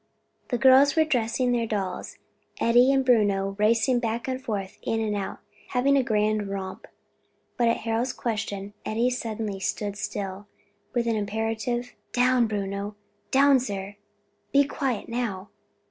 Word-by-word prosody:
The - - -1
little 260 +2 +5
girls 275 +2 +6
were 320 -1 +4
dressing 245 -3 +1
their 235 -1 +1
dolls, 195 -4 -3 0.4
Eddie 245 +3 +5
and 270 -1 +2
Bruno 200 -5 +2
racing 230 +3 +3
back 230 +1 -2
and 260 0 -3
forth, 200 -6 -4
in 225 - -1
and 215 -2 -1
out, 200 -1 -4 0.3
having 270 +3 +2
a 275 - +4
grand 215 -3 0
romp: 190 -1 -6 0.7
but 240 - +2
at 230 - +1
Harold's 230 +3 0
question, 205 -4 -4
Eddie 235 +3 +1
suddenly 220 -4 -3
stood 205 +1 -2
still, 200 0 -5 0.5
with 240 -1 +1
an 230 -1 +1
imperative, 225 +3 -2 0.2
"Down, 250 -1 +3
Bruno! 200 0 -3 0.3
down 275 0 +5
sir! 200 -4 -5 0.5
be 280 0 +5
quiet 270 -5 -2
now!" 225 -5 -3
225 Hz, 145 wpm, -26 LUFS, 205-250 Hz, 0.7 s, girls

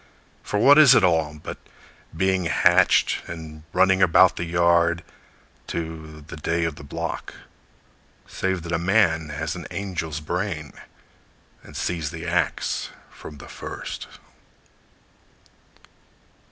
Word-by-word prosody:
For 105 - -3
what 140 +8 +7
is 135 -4 +8
it 110 - +5
all 80 -4 +2
but - - -7 0.6
being 95 0 +1
hatched, - - +3
And 80 -2 -8
running 95 +1 +3
about 90 +1 +5
the 85 - -3
yard, 85 0 +2 0.6
To 80 -2 -6
the 75 +1 -10
day 85 +2 -1
of 80 -2 -2
the - - -10
block? 70 - -5 0.9
Save 95 -3 -2
that 85 - -6
a 85 - 0
man 85 -4 +2
has 75 - -4
an - - -7
angel's 80 -6 -4
brain, 80 -1 -4 0.9
And - - -11
sees 80 -4 -2
the 85 +1 -7
ax 85 -1 -1 0.2
from 75 - -11
the - - -12
first! - - -7
85 Hz, 125 wpm, -24 LUFS, 80-95 Hz, 0.9 s, is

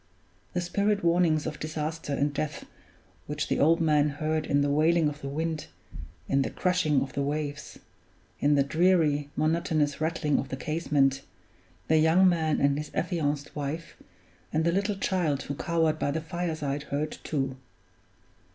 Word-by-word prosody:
The 180 - 0
spirit 200 +3 0
warnings 170 -3 +3
of 150 -1 -4
disaster 155 0 -4
and 140 +1 0
death 150 0 -3 0.6
which 150 +1 -2
the - - +1
old 165 +4 +4
man 150 -2 +3
heard 155 +2 -2
in 145 0 +2
the 145 - +1
wailing 160 +2 +3
of 150 0 -5
the 140 - -4
wind, 160 +2 -3 0.6
in 135 0 +2
the - - -1
crashing 180 -6 +1
of 135 - -8
the 140 - -1
waves, 145 0 -3 0.6
in 145 +1 +3
the 140 - +4
dreary, 155 -2 +2
monotonous 155 -2 0
rattling 155 -2 +1
of 135 - -4
the 135 - -4
casement, 145 -4 +1 0.7
the 160 - +4
young 165 +4 +5
man 160 -3 +2
and 140 +1 +2
his 150 - -5
affianced 150 -5 -1
wife 150 +3 -4 0.6
and 160 +1 +1
the 170 - +3
little 200 +3 0
child 170 -9 0
who 140 - -4
cowered 160 +1 0
by - - 0
the 150 +3 -1
fireside 155 -4 -3
heard 150 +2 -2
too. 135 -4 -2
155 Hz, 160 wpm, -28 LUFS, 145-165 Hz, 0.7 s, young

